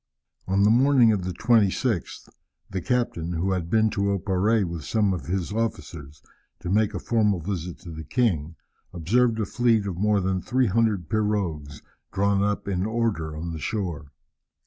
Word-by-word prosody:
On 95 +1 +2
the 105 - +5
morning 125 -1 +5
of 95 -4 -1
the 90 - -2
26th, 110 0 +1 0.4
the 95 - -3
captain, 115 -10 -1
who 90 +3 -1
had 90 -3 -2
been 110 +2 +3
to 100 0 0
Oparrée 100 +4 +1
with 85 -3 -5
some 105 +3 +1
of 90 - -6
his 95 +2 -2
officers, 75 - -4 0.4
to 90 - -4
make 105 +1 +2
a - - -2
formal 105 -5 +1
visit 90 -1 -4
to 85 - -9
the 80 0 -7
king, 85 - 0 0.4
observed 110 +7 +1
a 110 - 0
fleet 115 -2 +1
of 90 -3 -4
more 105 0 +2
than 95 0 -1
300 110 -6 +1
pirogues, 95 -10 -2 0.3
drawn 100 0 +1
up 100 0 -1
in 95 -2 -1
order 110 -9 -2
on 85 +1 -5
the 80 - -5
shore. 85 -8 -4
100 Hz, 170 wpm, -25 LUFS, 85-110 Hz, 0.4 s, the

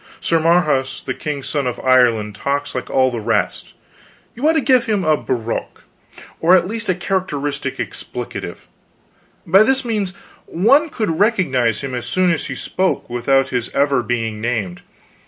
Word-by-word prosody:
Sir 165 - +1
Marhaus 155 -5 +1
the 130 - -2
king's 140 -1 -5
son 140 -2 -1
of 125 - -3
Ireland 120 -5 +3
talks 140 +6 -2
like 125 - -4
all 130 -1 +2
the 120 - -3
rest; 110 0 -1 0.6
you 285 +6 +1
ought - - +4
to 320 - +2
give 255 -2 +3
him 210 -4 0
a 155 -1 +4
brogue, 120 -5 -4 0.6
or 175 +3 +5
at 175 - +1
least 225 0 -3
a 185 - +2
characteristic 145 -7 -3
expletive; - - -6 0.8
by 190 +4 +5
this 265 +4 +2
means 210 -5 -1 0.3
one 275 - +3
would 165 -9 -1
recognize 145 - +2
him 135 -2 -5
as 125 -1 -4
soon 185 -1 +2
as 165 - -2
he - - -5
spoke, 185 -9 -2
without 135 +3 +2
his 120 -2 -2
ever 140 -2 +2
being 115 -3 -3
named. 110 -7 -2
145 Hz, 165 wpm, -19 LUFS, 125-185 Hz, 0.8 s, or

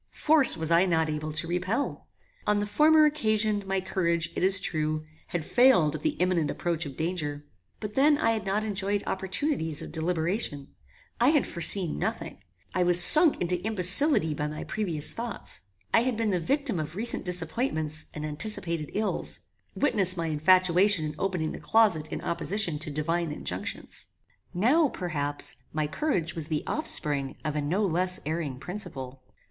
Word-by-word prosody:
Force 300 - +4
was 160 0 0
I 170 +3 +4
not 160 -2 0
able 155 0 -4
to 155 +2 -1
repel. 185 +10 -3 0.4
On 210 0 +2
the 205 - -1
former 305 +8 +4
occasion 215 -8 0
my 195 0 -1
courage, 170 -3 -2
it - - -2
is 190 +1 +7
true, 155 -2 -2 0.2
had 170 -3 -4
failed 240 - +3
at 155 - -6
the - - -1
imminent 175 -4 0
approach 165 -3 -3
of 135 - -11
danger; 150 -4 -4 0.3
but 210 -1 -6
then 290 +4 +4
I 285 -7 +1
had 220 -2 -2
not 205 +2 -1
enjoyed 205 -1 -1
opportunities 190 - -2
of - - -9
deliberation; 160 -2 -2 0.5
I 240 +3 +4
had 300 -2 +2
foreseen 170 - +4
nothing; - - -4 0.3
I 185 - 0
was 175 0 +5
sunk 305 - +7
into 180 0 -1
imbecility 195 - +4
by 150 0 -3
my 150 0 -6
previous 175 -9 0
thoughts; 235 -1 -4 0.3
I - - +6
had 245 -2 -2
been 225 -2 -1
the 180 - 0
victim 270 - 0
of 155 +1 -6
recent 230 +4 +1
disappointments 165 - -2
and 150 0 -5
anticipated 165 -1 -2
ills: 215 0 -2 0.3
Witness 190 -10 +2
my 165 - -2
infatuation 180 +3 +3
in 150 0 -6
opening 180 -5 -2
the - - -8
closet 200 -9 +1
in - - -5
opposition 175 -2 -1
to 160 0 -6
divine 165 +2 -2
injunctions. - - -4 0.4
Now, 265 - +2
perhaps, 145 - -3
my 155 0 -2
courage 170 - -2
was 160 -3 -4
the 155 -2 -3
offspring 145 - -2
of 155 -1 -3
a 150 - -1
no 180 +9 -1
less 180 +1 0
erring 155 -4 -4
principle. 135 -7 -7
180 Hz, 165 wpm, -26 LUFS, 155-210 Hz, 0.5 s, is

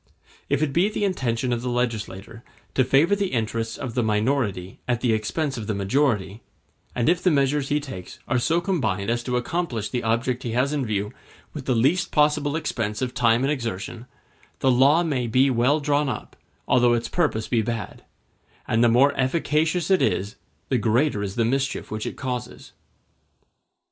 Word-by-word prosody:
If 140 +1 +1
it 145 -3 -1
be 180 +6 +3
the 210 - -3
intention 125 - -1
of 120 - -2
the 125 - -3
legislator 115 -2 -3 0.3
to 130 - +3
favor 150 +10 +3
the 200 -1 -1
interests 115 -1 -2
of 125 -3 -5
the 125 - +1
minority 105 -4 -1
at 120 -2 0
the 120 -3 +2
expense 135 +6 -2
of 105 - -6
the 110 - -1
majority, 105 -1 0 0.5
and 120 - 0
if 175 +1 +3
the 185 - +3
measures 140 -2 +1
he 150 - +2
takes 110 -11 -9
are 125 +1 +1
so 165 +8 +1
combined 125 - -1
as 120 0 0
to 125 -1 0
accomplish 125 - -2
the 120 +3 -2
object 120 +3 0
he 115 - -4
has 130 +4 +1
in 140 -5 -1
view 105 +1 -2 0.4
with 145 -4 -7
the 130 - +1
least 140 +10 +2
possible 150 -1 +2
expense 115 -8 -2
of 125 -1 -3
time 120 0 +3
and 140 - +1
exertion, 115 -2 -4 0.5
the 130 - +2
law 140 +7 +5
may 135 -7 -1
be 130 +4 +3
well 130 +5 +2
drawn 145 -1 +1
up, - - -6 0.3
although 120 -1 +4
its 120 0 -1
purpose 145 -11 0
be 115 -3 +1
bad; 115 +1 -5 0.6
and 115 +2 +2
the 120 - +5
more 135 +5 +4
efficacious 160 +5 0
it 190 - +4
is, 100 +2 0 0.3
the 130 - +2
greater 115 +1 +1
is 100 -1 -4
the 115 - +1
mischief 135 +3 -1
which 110 0 -3
it - - -6
causes. 125 -2 -5
125 Hz, 185 wpm, -24 LUFS, 115-145 Hz, 0.6 s, law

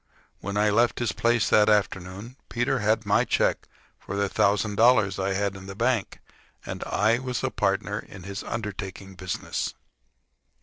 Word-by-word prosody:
When 100 0 -4
I 105 0 +3
left 115 +3 +3
his 120 -3 0
place 115 -1 +2
that 105 0 +5
afternoon 100 +2 -1
Peter 120 +2 0
had 110 0 +1
my 100 - +3
check - - 0 0.3
for 100 - -6
the 100 0 +1
thousand 105 +2 +1
dollars 110 -3 +4
I 95 0 0
had 100 0 -1
in 95 0 -10
the 95 - -7
bank, 115 -1 0 0.5
and - - -5
I 110 +3 +2
was 125 -1 -3
a 130 - 0
partner 100 +1 0
in 95 -2 -11
his 100 +2 -5
undertaking 100 -3 -5
business. 90 -1 -4
105 Hz, 165 wpm, -26 LUFS, 95-115 Hz, 0.5 s, that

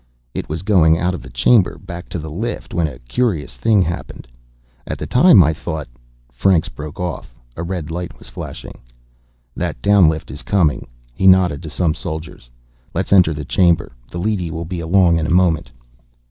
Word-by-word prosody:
It - - -5
was 80 +3 -4
going 85 -6 +4
out 90 +2 0
of 90 - -5
the - - -11
chamber, 95 -8 +3
back 85 +1 -9
to - - -4
the 80 -2 -6
lift, 110 +8 -5
when 85 -2 +1
a 75 - -8
curious 75 - -2
thing 100 - +3
happened. 85 -7 -6 0.6
At - - -4
the - - -5
time, 125 - +6
I 80 +1 +2
thought 80 -1 -5 0.3
" - - -35
Franks 95 -5 +3
broke 75 +8 -9
off. 90 -8 -5 0.2
A - - -5
red 85 -2 -4
light 85 -7 -5
was - - -13
flashing. - - -9 0.8
"That - - -3
down 100 -5 +5
lift 80 -4 -4
is 70 +3 -8
coming." 85 -8 +1 0.3
He 95 +10 +1
nodded 90 -6 +4
to 80 - -7
some 80 0 0
soldiers. 80 -6 -7 0.5
"Let's - - 0
enter 90 -4 +6
the 75 -1 -5
chamber. 85 0 +2 0.2
The - - -7
leady 95 -2 -1
will 80 +1 -5
be 90 +1 -5
along 85 0 +3
in 80 - -1
a - - -3
moment." 90 -3 +2
85 Hz, 190 wpm, -19 LUFS, 80-95 Hz, 0.8 s, time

